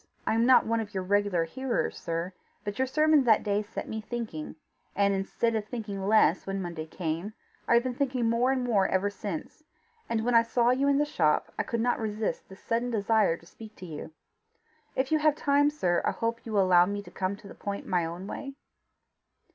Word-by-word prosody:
"I -, -, +1 dB
am 230 Hz, +2 st, +3 dB
not 260 Hz, -, +6 dB
one 230 Hz, +1 st, +1 dB
of 210 Hz, -2 st, -6 dB
your 190 Hz, -, -1 dB
regular 200 Hz, -2 st, +2 dB
hearers, 255 Hz, +9 st, -2 dB
sir; 170 Hz, +2 st, -4 dB, 0.3 s
but 205 Hz, +2 st, -5 dB
your 260 Hz, -, +2 dB
sermon 305 Hz, +1 st, +4 dB
that 220 Hz, -3 st, +4 dB
day 205 Hz, 0 st, +1 dB
set 210 Hz, +1 st, -7 dB
me 220 Hz, 0 st, -4 dB
thinking, 215 Hz, -11 st, -5 dB, 0.4 s
and 200 Hz, 0 st, +3 dB
instead 195 Hz, +4 st, -1 dB
of 215 Hz, -1 st, -1 dB
thinking 210 Hz, -5 st, -5 dB
less 210 Hz, -5 st, +4 dB
when 195 Hz, 0 st, -2 dB
Monday 170 Hz, -4 st, -5 dB
came, 170 Hz, +5 st, -4 dB, 0.3 s
I 235 Hz, -, +5 dB
have 235 Hz, -, +4 dB
been 255 Hz, -1 st, -2 dB
thinking 255 Hz, -2 st, 0 dB
more 235 Hz, +3 st, +2 dB
and 260 Hz, -1 st, 0 dB
more 210 Hz, -6 st, +2 dB
ever 190 Hz, +2 st, 0 dB
since; 200 Hz, -, -6 dB, 0.5 s
and 225 Hz, -1 st, 0 dB
when 245 Hz, -, +1 dB
I 230 Hz, -, +7 dB
saw 235 Hz, +1 st, +2 dB
you 270 Hz, +2 st, +2 dB
in 280 Hz, 0 st, +4 dB
the 295 Hz, -, +3 dB
shop, 155 Hz, -, +1 dB
I -, -, +4 dB
could 235 Hz, -1 st, -2 dB
not 245 Hz, +1 st, +1 dB
resist 215 Hz, -1 st, -3 dB
the 190 Hz, -, -10 dB
sudden 230 Hz, +4 st, -2 dB
desire 215 Hz, -5 st, +2 dB
to 170 Hz, -, -19 dB
speak 215 Hz, +4 st, -13 dB
to 185 Hz, -, -10 dB
you. 160 Hz, -2 st, -7 dB, 0.8 s
If 260 Hz, +2 st, 0 dB
you 310 Hz, -, +4 dB
have 305 Hz, -1 st, +3 dB
time, 290 Hz, 0 st, +3 dB
sir, 180 Hz, -13 st, 0 dB
I -, -, +2 dB
hope 230 Hz, 0 st, -3 dB
you 220 Hz, -, -5 dB
will 200 Hz, -2 st, +4 dB
allow 180 Hz, -1 st, +5 dB
me 205 Hz, +1 st, -3 dB
to -, -, -13 dB
come 190 Hz, +1 st, -2 dB
to 200 Hz, -, -14 dB
the -, -, -10 dB
point 200 Hz, 0 st, -5 dB
my 180 Hz, -2 st, +1 dB
own 170 Hz, +3 st, -5 dB
way?" 275 Hz, +6 st, -6 dB
215 Hz, 220 wpm, -28 LUFS, 190-245 Hz, 0.8 s, I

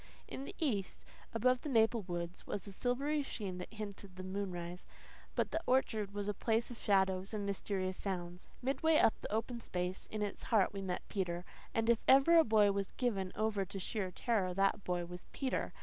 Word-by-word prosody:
In 270 Hz, -, -5 dB
the -, -, -8 dB
east, 215 Hz, -, -1 dB, 0.3 s
above 250 Hz, +2 st, +2 dB
the 300 Hz, -, -4 dB
maple 225 Hz, -2 st, +4 dB
woods, 175 Hz, -1 st, -5 dB
was 205 Hz, -, -3 dB
a 200 Hz, -, -7 dB
silvery 275 Hz, +8 st, 0 dB
sheen 200 Hz, -9 st, -4 dB
that 180 Hz, -, -7 dB
hinted 200 Hz, -3 st, -7 dB
the 185 Hz, -, -7 dB
moonrise. 180 Hz, -2 st, -4 dB, 0.5 s
But -, -, +1 dB
the 325 Hz, -, 0 dB
orchard 220 Hz, -6 st, +2 dB
was 205 Hz, 0 st, -3 dB
a 210 Hz, -, +1 dB
place 225 Hz, +3 st, 0 dB
of 235 Hz, -, -8 dB
shadows 190 Hz, 0 st, +2 dB
and 205 Hz, -1 st, -2 dB
mysterious 190 Hz, -1 st, -2 dB
sounds. 180 Hz, -2 st, -4 dB, 0.2 s
Midway 305 Hz, +4 st, +3 dB
up 225 Hz, -, +6 dB
the -, -, -5 dB
open 230 Hz, +3 st, -1 dB
space 180 Hz, -1 st, -3 dB
in 215 Hz, -1 st, -3 dB
its 205 Hz, -, -4 dB
heart 210 Hz, -5 st, +3 dB
we 195 Hz, -, -4 dB
met 185 Hz, -2 st, -3 dB
Peter; 180 Hz, -3 st, -2 dB, 0.3 s
and 225 Hz, 0 st, 0 dB
if 235 Hz, -1 st, +5 dB
ever 275 Hz, +6 st, +8 dB
a -, -, +7 dB
boy 215 Hz, -4 st, +5 dB
was 195 Hz, -1 st, -2 dB
given 195 Hz, -7 st, 0 dB
over 215 Hz, -2 st, +1 dB
to 195 Hz, -, -6 dB
sheer 195 Hz, 0 st, -2 dB
terror 185 Hz, -2 st, 0 dB
that 195 Hz, +1 st, +2 dB
boy 175 Hz, -1 st, -1 dB
was 180 Hz, +1 st, -9 dB
Peter. 265 Hz, -2 st, -1 dB
200 Hz, 195 wpm, -35 LUFS, 185-230 Hz, 0.5 s, ever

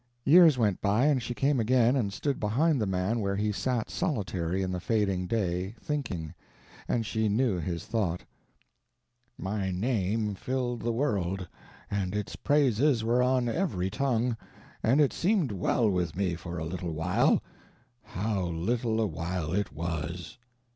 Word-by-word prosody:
Years 160 Hz, -2 st, +7 dB
went 105 Hz, -6 st, +1 dB
by 105 Hz, +6 st, +2 dB
and 145 Hz, -4 st, +3 dB
she 120 Hz, +1 st, -4 dB
came 140 Hz, +1 st, +2 dB
again, 120 Hz, +2 st, +3 dB
and 110 Hz, -7 st, 0 dB
stood 140 Hz, +7 st, -2 dB
behind 135 Hz, +7 st, +2 dB
the 105 Hz, -, 0 dB
man 95 Hz, +5 st, 0 dB
where 100 Hz, -2 st, -1 dB
he 105 Hz, +1 st, 0 dB
sat 120 Hz, +2 st, -2 dB
solitary 95 Hz, -, -1 dB
in 95 Hz, -, -2 dB
the 90 Hz, -, -2 dB
fading 100 Hz, -3 st, 0 dB
day, 95 Hz, -1 st, -1 dB
thinking. 95 Hz, -, -3 dB, 0.5 s
And 115 Hz, -2 st, 0 dB
she 110 Hz, -1 st, 0 dB
knew 110 Hz, -3 st, +1 dB
his 85 Hz, 0 st, -4 dB
thought: 95 Hz, -7 st, -1 dB, 1.1 s
"My 95 Hz, 0 st, -2 dB
name 105 Hz, +1 st, 0 dB
filled 125 Hz, +3 st, -2 dB
the 120 Hz, -, 0 dB
world, 95 Hz, -8 st, -1 dB, 0.4 s
and 100 Hz, -1 st, -1 dB
its 105 Hz, -2 st, -3 dB
praises 140 Hz, -3 st, +2 dB
were 120 Hz, +2 st, +2 dB
on 125 Hz, -1 st, +2 dB
every 115 Hz, -, -1 dB
tongue, 125 Hz, -2 st, 0 dB, 0.5 s
and 125 Hz, +6 st, +3 dB
it 145 Hz, -3 st, +4 dB
seemed 185 Hz, -, +1 dB
well 105 Hz, +4 st, +1 dB
with 90 Hz, -5 st, 0 dB
me 95 Hz, -2 st, 0 dB
for 85 Hz, +1 st, -6 dB
a 80 Hz, -, -3 dB
little 85 Hz, 0 st, -4 dB
while. 80 Hz, +4 st, +2 dB, 0.6 s
How 105 Hz, -1 st, -2 dB
little 110 Hz, +7 st, -1 dB
a 110 Hz, -, +2 dB
while 85 Hz, -2 st, -3 dB
it 100 Hz, +2 st, 0 dB
was! 85 Hz, +6 st, -5 dB
105 Hz, 155 wpm, -29 LUFS, 90-125 Hz, 1.1 s, Years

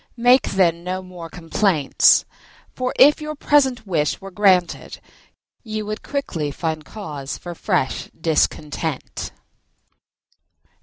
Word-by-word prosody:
Make, 245 Hz, +2 st, +4 dB
then, 170 Hz, -3 st, +2 dB
no 185 Hz, +1 st, -3 dB
more 180 Hz, -2 st, -10 dB
complaints. 165 Hz, -2 st, +3 dB, 0.5 s
For, 255 Hz, 0 st, -2 dB
if 295 Hz, +3 st, +6 dB
your 305 Hz, 0 st, -5 dB
present 265 Hz, -5 st, +2 dB
wish 155 Hz, -6 st, 0 dB
were 195 Hz, 0 st, -10 dB
granted, 185 Hz, -3 st, +1 dB, 0.6 s
you 215 Hz, -2 st, -5 dB
would 215 Hz, 0 st, -5 dB
quickly 175 Hz, -, -3 dB
find 155 Hz, +1 st, -3 dB
cause 150 Hz, -6 st, -7 dB
for 175 Hz, -, -8 dB
fresh 130 Hz, -5 st, -1 dB
discontent." 155 Hz, -2 st, -1 dB
180 Hz, 110 wpm, -21 LUFS, 160-220 Hz, 0.6 s, if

